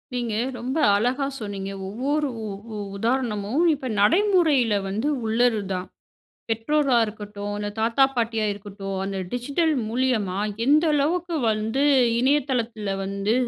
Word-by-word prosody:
நீங்க 240 Hz, -3 st, -2 dB, 0.2 s
ரொம்ப 255 Hz, +5 st, -3 dB, 0.2 s
அழகா 250 Hz, +7 st, +1 dB
சொன்னீங்க. 200 Hz, -3 st, -5 dB, 0.2 s
ஒவ்வொரு 280 Hz, +9 st, -1 dB, 0.2 s
உ -, -, -4 dB, 0.3 s
உ -, -, -5 dB, 0.2 s
உதாரணமும் 230 Hz, -, 0 dB
இப்ப 275 Hz, -3 st, -5 dB
நடைமுறையில 315 Hz, -, +4 dB, 0.2 s
வந்து 215 Hz, +8 st, -1 dB, 0.2 s
உள்ளது 225 Hz, 0 st, +2 dB
தான். 185 Hz, 0 st, -3 dB, 0.6 s
பெற்றோரா 255 Hz, +4 st, +2 dB
இருக்கட்டும், 210 Hz, -1 st, -7 dB
அந்த 205 Hz, 0 st, -3 dB
தாத்தா 230 Hz, +4 st, +3 dB
பாட்டியா 225 Hz, -2 st, 0 dB
இருக்கட்டும், 200 Hz, -1 st, -6 dB
அந்த 195 Hz, 0 st, -4 dB
டிஜிட்டல் 285 Hz, +7 st, 0 dB, 0.2 s
மூலியமா 225 Hz, -6 st, 0 dB, 0.3 s
எந்த 300 Hz, +4 st, +5 dB
அளவுக்கு 335 Hz, +4 st, 0 dB
வந்து, 220 Hz, +5 st, 0 dB, 0.4 s
இணையதளத்துல 245 Hz, -6 st, 0 dB
வந்து 200 Hz, +2 st, -1 dB
230 Hz, 120 wpm, -24 LUFS, 210-275 Hz, 0.6 s, எந்த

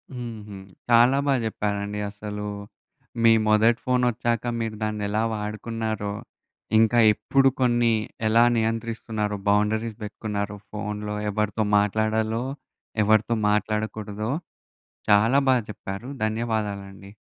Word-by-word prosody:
హుహు. 110 Hz, -5 st, -7 dB, 0.3 s
చాలా 120 Hz, +3 st, +6 dB
బా 140 Hz, -, +4 dB
జెప్పారండి. 105 Hz, -1 st, -2 dB
అసలూ 105 Hz, 0 st, -6 dB, 0.8 s
మీ 115 Hz, -, +7 dB, 0.2 s
మొదటి 110 Hz, +4 st, +4 dB
ఫోనొచ్చాక, 120 Hz, -2 st, +1 dB, 0.2 s
మీరు 110 Hz, -1 st, -3 dB
దాన్నెలా 105 Hz, 0 st, -1 dB
వాడుకున్నారో, 110 Hz, 0 st, -3 dB, 0.7 s
ఇంకా 115 Hz, +2 st, +4 dB
ఎప్పుడు 135 Hz, +4 st, +3 dB
కొన్ని 120 Hz, -2 st, +3 dB, 0.4 s
ఎలా 115 Hz, +2 st, +5 dB
నియంత్రిస్తున్నారో, 110 Hz, -2 st, -2 dB
బౌండరీస్ 105 Hz, +2 st, +1 dB
బెట్టుకున్నారో, 105 Hz, -1 st, -4 dB
ఫోన్‌లో 105 Hz, 0 st, -4 dB
ఎవరితో 105 Hz, +1 st, -1 dB
మాట్లాడాలో, 110 Hz, +2 st, +1 dB, 0.6 s
ఎవరితో 110 Hz, +2 st, +3 dB
మాట్లాడకూడదో, 105 Hz, +1 st, -2 dB, 0.8 s
చాలా 110 Hz, +6 st, +5 dB
బా 130 Hz, -, +6 dB
చెప్పారు. 100 Hz, +4 st, -7 dB, 0.2 s
ధన్యవాదాలండి. 105 Hz, -3 st, -3 dB
110 Hz, 95 wpm, -25 LUFS, 105-115 Hz, 0.8 s, మీ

